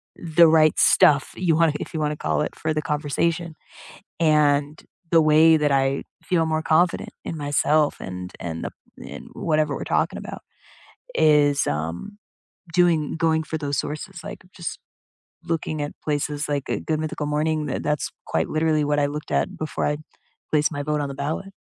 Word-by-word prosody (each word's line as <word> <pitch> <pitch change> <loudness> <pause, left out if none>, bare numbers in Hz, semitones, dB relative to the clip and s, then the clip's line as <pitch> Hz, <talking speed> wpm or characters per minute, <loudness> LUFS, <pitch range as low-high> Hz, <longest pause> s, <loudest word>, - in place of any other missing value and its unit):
The 170 0 +4
right 155 -1 +4
stuff, 145 -2 +4
you 170 -3 +1
wanna 165 -1 +3
if - - -7
you 160 - -2
wanna 150 -1 -1
call - - -1
it, 150 - -3
for 155 0 -2
the 155 - -1
conversation. 155 +3 -1 0.6
and 150 -2 +2 0.3
the 165 -1 +6
way 160 +1 +6
that 150 -1 +1
I 135 0 +1 0.2
feel 165 -3 +1
more 160 0 -1
confident 170 +2 +2
in 165 - -5
myself 145 +1 +1
and 90 -1 -7
and 80 -1 -5
the - - -4 0.3
in - - -9
whatever 155 -3 0
we're - - -5
talking - - 0
about, - - -8 0.7
is, 145 -2 +4
um, 80 - -4 0.6
doing 170 -3 +2
going 160 -1 +1
for 160 - -4
those 145 -2 -2
sources, 170 +4 -5
like - - -8
just 170 -4 -5 0.7
looking 155 -2 -2
at 145 - -4
places 150 0 -2
like, 145 -2 -2
uh, - - 0
Good 155 -1 0
Mythical 155 -1 -3
Morning. 150 +1 0
Th - - -3
that's 150 -1 -1 0.2
quite 80 - -1
literally 155 -1 +1
what 145 0 0
I 145 - +3
looked 150 +1 -6
at - - 0
before 155 - -3
I 150 0 0 0.5
placed 150 +1 +2
my 145 -1 -3
vote 150 +1 -1
on 140 - -3
the - - -6
ballot. 155 +8 -4
150 Hz, 175 wpm, -23 LUFS, 145-160 Hz, 0.7 s, the